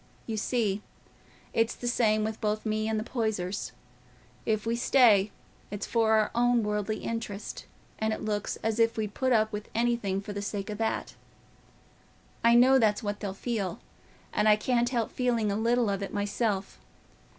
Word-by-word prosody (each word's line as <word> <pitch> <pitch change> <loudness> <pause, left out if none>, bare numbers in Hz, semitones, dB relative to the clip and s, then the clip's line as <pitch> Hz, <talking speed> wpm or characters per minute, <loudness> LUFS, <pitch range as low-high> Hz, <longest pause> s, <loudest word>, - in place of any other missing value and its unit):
You 225 - -3
see, 215 -2 0 0.7
it's 225 0 +1
the 245 - -5
same 215 -3 +2
with 220 +1 -3
both 215 0 -1
me 215 0 0
and 220 -1 0
the - - -3
Poysers: 215 -6 -2 0.8
if 215 -1 0
we 230 +1 0
stay, 230 -5 +5 0.4
it's 205 0 -4
for 225 -2 +2
our 215 -1 +3
own 240 0 +3
worldly 210 +1 -2
interest, 225 -3 -5 0.3
and 220 0 0
it 220 - -3
looks 210 -1 -2
as 225 0 0
if 230 0 +3
we'd 210 -2 -2
put 260 -1 0
up 220 -2 +3
with 210 -1 -6
anything 230 -5 +1
for 205 +1 -7
the 200 - -4
sake 205 0 -4
o' - - -2
that. 220 +2 -2 1.3
I 235 0 +6
know 260 +2 +6
that's 215 -1 +2
what 205 0 -3
they'll 195 -2 -4
feel, 200 -5 -3 0.5
and 215 - +3
I 210 - +7
can't 240 +2 +1
help 235 -3 -1
feeling 235 -4 0
a - - -1
little 235 +2 +2
of 200 -1 -1
it 200 - -4
myself. 205 0 -2
220 Hz, 175 wpm, -28 LUFS, 205-235 Hz, 1.3 s, I